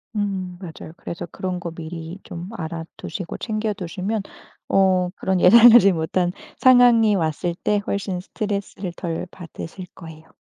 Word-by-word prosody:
음 190 -4 -2
맞아요. 165 -3 -9
그래서 170 - -6
그런 185 -1 -4
거 170 -1 -5
미리 165 +2 -8
좀 175 +3 -8
알아 165 -1 -5
두시고 185 -5 -6
챙겨 215 -1 -2
두시면 195 +3 -3 0.5
어 185 -2 +3
그런 190 -1 0
예상하지 225 +1 +8
못한 175 +2 0 0.3
상황이 245 -4 +6
왔을 170 0 -1
때 210 -1 +2
훨씬 195 -2 -2
스트레스를 200 -2 -4
덜 165 -1 -3
받으실 180 +1 -9
거예요. 160 -2 -12
185 Hz, 300 characters per minute, -22 LUFS, 170-205 Hz, 0.5 s, 예상하지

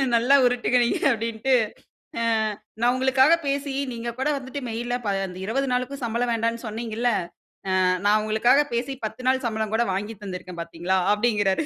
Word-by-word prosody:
நல்லா 245 +4 +4
உருட்டுங்க 245 0 +2
நீங்க - - 0
அப்டின்ட்டு 230 +2 -1 0.7
அ - - -1 0.6
நான் 245 +1 +4
உங்களுக்காக 265 +3 +4
பேசி 280 0 -1 0.2
நீங்க 235 0 -4
கூட 275 +3 +1
வந்துட்டு 265 +2 -6
மெயில்ல 240 +2 -3
ப 205 - 0 0.4
20 270 +5 -1
நாளுக்கு 255 +2 -2
சம்பளம் 235 +1 0
வேண்டாம்ன்னு 230 +1 -1
சொன்னீங்கில்ல. 230 +2 -2 0.7
அ - - +3 0.2
நான் 210 +1 +5
உங்களுக்காக 230 +6 +3
பேசி 255 +3 -2
10 250 +4 -6
நாள் 260 0 +2
சம்பளம் 220 -1 -2
கூட 235 +1 +2
வாங்கி 205 +3 -3
தந்திருக்கேன் 180 -2 -7
பார்த்தீங்களா 175 +3 -1
அப்டிங்கிறாரு. 210 -1 +1
235 Hz, 155 wpm, -24 LUFS, 215-260 Hz, 0.7 s, நான்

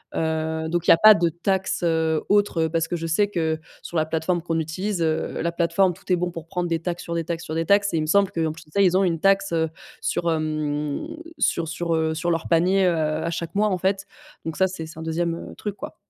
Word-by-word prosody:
Heu, 160 0 -1
donc 175 0 -1
il - - +8
y - - +11
a - - +4
pas 215 0 +10
de 170 -1 +2
taxe, 190 +3 -1
heu, 160 -2 +1
autre, 205 -5 +3
heu, - - -1
parce 165 0 0
que 175 - -2
je 165 -1 -3
sais 185 +6 +2
que, 160 -5 -1 0.2
sur 170 - -5
la 155 - +2
plateforme 160 +2 -1
qu'on 165 -1 -1
utilise, 180 +4 -3
heu, 160 -1 -1
la 170 - 0
plateforme, 170 +2 +2
tout - - -19
est - - +5
bon 175 0 -2
pour 165 -2 -8
prendre 180 -1 -2
des 165 -1 0
taxes, 175 +1 -4
sur 170 - -4
des 165 -1 -1
taxes, 170 -1 -3
sur 155 - -5
des 165 0 0
taxes, 200 +2 +3
et - - +2
il - - +1
me - - -1
semble 200 +4 +3
qu'en 165 -4 -1
plus 160 0 -13
de 150 - -24
ça, 200 - +2
ils 185 -2 +4
ont 195 - +3
une 170 -3 0
taxe, 195 +1 +3
heu, 160 -1 +1 0.3
sur, 170 -1 0
hem, 150 -2 -1 0.4
sur 165 -1 +1
sur, 170 +1 -2
heu, 160 0 +1
sur 160 +2 -2
leurs 165 -1 -1
paniers, 185 +3 +3
heu, 175 -2 +3 0.3
à - - 0
chaque 170 0 -4
mois, 210 +1 +3
en 185 - 0
fait, 195 +2 0 0.4
donc 160 -1 -3
ça, 190 - +4
c'est 180 -3 -6
c'est 160 0 -11
un - - -6
deuxième 165 +1 -3
truc, 205 -2 -4
quoi. - - -8
170 Hz, 270 wpm, -24 LUFS, 160-185 Hz, 0.4 s, y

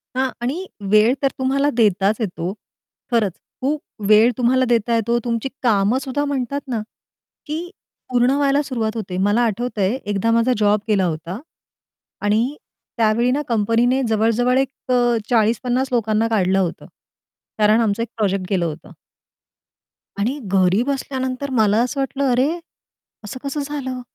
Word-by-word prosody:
हां. 260 0 +1
आणि 305 +10 -2 0.3
वेळ 215 +4 +5
तर 275 - +3
तुम्हाला 275 +2 +1
देताच 205 0 +3
येतो. 185 -3 -3 0.6
खरंच 220 -5 +2 0.3
खूप 285 +3 -1 0.3
वेळ 220 +3 +6
तुम्हाला 255 +1 +3
देता 235 0 +2
येतो 235 +1 +1
तुमची 235 +2 -1
कामं 215 +1 +3
सुद्धा 275 +2 -2
म्हणतात 280 0 -2
ना, 230 -4 -2 0.7
की 325 +4 -4 0.4
पूर्ण 245 +1 +3
व्हायला 285 0 +2
सुरुवात 230 -6 -3
होते. 185 -5 -4
मला 205 +5 +2
आठवतंय 225 0 -1
एकदा 205 +2 0
माझा 230 +2 +3
जॉब 210 0 +3
गेला 200 -4 +2
होता. 170 +5 -4 0.8
आणि 225 +7 +1 0.4
त्यावेळी 230 +2 +2
ना 290 +3 0
कंपनीने 235 +4 +2
जवळ-जवळ 230 +3 +2
एक 270 -1 -2
अ, 240 -1 +3
40-50 245 +3 +1
लोकांना 220 -1 +1
काढलं 195 -3 +2
होतं. 180 -3 -2 0.7
कारण 215 +1 +4
आमचं 220 +1 0
एक 230 - -6
प्रोजेक्ट 195 -3 0
गेलं 180 -3 +1
होतं. 155 0 -6 1.3
आणि 255 +8 -1
घरी 190 +1 +2
बसल्यानंतर 265 0 -3
मला 215 -3 +3
असं 275 +3 -3
वाटलं, 270 0 -1
"अरे 255 +4 +3 0.7
असं 210 +5 -7
कसं 280 +1 -3
झालं? 270 -3 -4
235 Hz, 140 wpm, -20 LUFS, 210-260 Hz, 1.3 s, वेळ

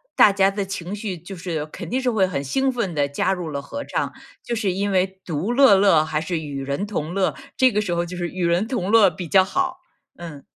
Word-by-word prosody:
大 205 - +7
家 195 0 +3
的 200 0 -2
情 190 0 -5
绪 200 -4 -5
就 175 +4 -9
是 165 -4 -4
肯 165 +2 -9
定 260 +1 0
是 255 - +1
会 215 -5 +2
很 155 -7 -3
兴 265 - 0
奋 205 -10 -3
地 140 -1 +1
加 165 +6 0
入 175 -4 -5
了 140 -1 -4
合 285 - -6
唱。 - - -3 0.3
就 235 - -3
是， 205 -4 0
因 200 +2 -1
为 190 +1 0
独 175 +7 -2
乐 260 -4 +6
乐 190 -6 +4
还 155 -1 -2
是 165 0 -2
与 140 -3 -5
人 140 +10 -3
同 170 -5 -3
乐 195 -1 0 0.2
这 260 -1 +5
个 210 - +2
时 180 -4 -2
候 170 0 0
就 180 +1 -7
是 175 -1 -3
与 180 -2 -2
人 175 +5 +2
同 195 -8 -2
乐 215 -3 +6
比 180 -3 -7
较 190 +3 +5
好， 360 - -2 0.4
嗯。 160 -5 -9
185 Hz, 265 characters per minute, -22 LUFS, 165-205 Hz, 0.4 s, 大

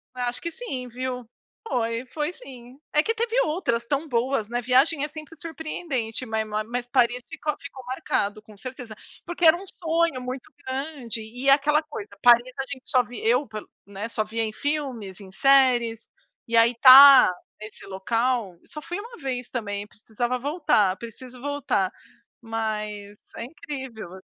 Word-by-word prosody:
Acho 245 -1 -3
que 340 - -4
sim, 270 - -6
viu. 250 0 -5 0.4
Foi, 230 - -1
foi 300 +5 -3
sim. 255 -3 -13
É 300 - +3
que 455 - 0
teve 465 +2 0
outras 300 - -1
tão 285 +5 -1
boas, 240 -2 0
né. 240 +1 -1
Viagem 265 +5 +3
é - - 0
sempre 310 +1 -11
surpreendente, 305 -8 -4
ma 220 -2 -1 0.2
mas 245 +2 -4
Paris 245 -1 +2
ficou 310 -1 -3
ficou 275 -2 -10
marcado, 215 -4 -2
com 215 -1 -17
certeza. 250 -1 -8 0.3
Porque 345 0 -1
era 320 0 +8
um 370 +3 -8
sonho 330 -5 0
muito 255 +1 -6
grande, 260 -3 -4
e 245 +5 -6
é - - +8
aquela 300 +2 +4
coisa: 295 -9 -8
Paris 240 +1 +6
a - - 0
gente 265 -2 -8
só 255 -1 +4
vi 245 -1 -9
eu, 250 +5 +3 0.4
né, 200 +3 -6
só 220 - -1
via 225 +2 -3
em 215 -1 -3
filmes, 260 -10 -3
em 195 -2 -12
séries, 245 -1 +3 0.4
e 230 0 +1
aí 230 +1 +6
estar 260 0 +10 0.3
nesse 215 0 -11
local 225 +1 -1
só 300 - -8
fui 350 +4 -5
uma 470 +3 -10
vez 255 -4 -4
também, 205 -4 -3
precisava 240 +4 -3
voltar, 275 - +2
preciso 245 +3 -10
voltar. 280 -9 -1 0.5
Mas 215 -2 -4 0.2
é - - -5
incrível 265 - -8
a 190 - -12
250 Hz, 165 wpm, -25 LUFS, 225-285 Hz, 0.5 s, estar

